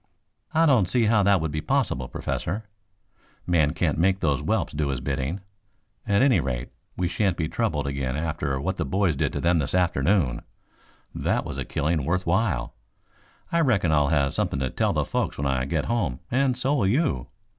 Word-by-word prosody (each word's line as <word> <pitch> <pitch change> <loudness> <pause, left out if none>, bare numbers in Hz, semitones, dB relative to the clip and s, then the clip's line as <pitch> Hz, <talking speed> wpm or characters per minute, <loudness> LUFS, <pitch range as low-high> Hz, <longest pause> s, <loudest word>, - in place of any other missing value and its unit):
"I 165 +1 +3
don't 120 - +4
see 120 0 +2
how 110 -1 +4
that 100 -2 +3
would 80 -1 -2
be 75 +1 -2
possible, 65 -3 0
Professor. 100 - -3 0.8
Man 80 -4 +2
can't - - 0
make 95 +2 +3
those 70 -7 +1
whelps - - -1
do 75 0 -1
his 70 -3 -2
bidding. 70 +7 -3 0.7
At 100 +4 +3
any 135 -3 +4
rate, 60 -2 -3 0.3
we 90 - 0
shan't 95 0 0
be 80 - -1
troubled 75 -2 -1
again 70 -1 -2
after 75 -4 -2
what - - -2
the - - 0
boys 95 0 +1
did - - 0
to - - -2
them 85 0 +2
this 70 +3 -1
afternoon. 90 -5 +2 0.7
That - - -1
was - - -5
a - - -3
killing 75 0 -1
worth 90 +6 -1
while. 85 - 0 0.8
I 170 - +2
reckon 110 - +2
I'll 75 -2 +3
have 70 -2 +1
something 70 - -1
to 65 - -1
tell - - +1
the - - 0
folks - - -2
when 70 - -2
I 65 -2 0
get 80 +1 -1
home 90 - -1
and 130 0 +2
so 130 +2 +1
will 120 -10 +2
you. 105 - +1
80 Hz, 195 wpm, -25 LUFS, 70-100 Hz, 0.8 s, don't